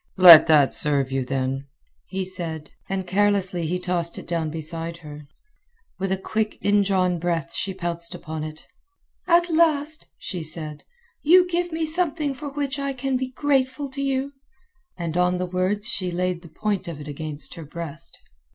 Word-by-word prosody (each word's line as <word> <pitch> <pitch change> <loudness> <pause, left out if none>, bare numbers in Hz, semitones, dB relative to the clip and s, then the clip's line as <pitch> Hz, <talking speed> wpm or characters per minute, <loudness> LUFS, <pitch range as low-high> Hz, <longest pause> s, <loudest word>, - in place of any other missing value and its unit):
"Let 170 -4 +11
that 150 -4 +5
serve 140 -3 +3
you, 135 0 0
then," 135 +1 -2 0.4
he 190 0 -3
said; 165 -5 -4 0.2
and 190 -1 -2
carelessly 190 -3 +1
he 180 +3 -1
tossed 180 -2 -2
it - - -9
down 165 -2 -1
beside 165 +2 -5
her. 150 -1 -10 0.7
With 190 0 -2
a 190 - +1
quick 215 +3 -2
indrawn 195 -3 +2
breath 165 -4 -2
she 190 -1 -2
pounced 170 -2 -1
upon 155 0 -6
it. 155 0 -8 0.6
"At 345 0 +4
last," 315 -2 +2
she 180 -3 -5
said, 155 -1 -6 0.4
"you 360 +4 +6
give 350 0 -1
me 320 0 -1
something 310 -3 0
for 290 +2 -7
which 280 -1 -3
I 275 0 -2
can 265 0 -2
be 255 0 -1
grateful 270 0 0
to 275 +1 -4
you." 275 0 -1 0.6
And 170 -2 -4
on 180 0 +2
the 180 - -1
words 185 +4 0
she 185 -6 +1
laid 180 0 -1
the 170 - -13
point 195 +3 -2
of 165 -4 -6
it 150 - -9
against 150 0 -5
her 165 - -8
breast. 155 -1 -8
180 Hz, 170 wpm, -24 LUFS, 160-260 Hz, 0.7 s, Let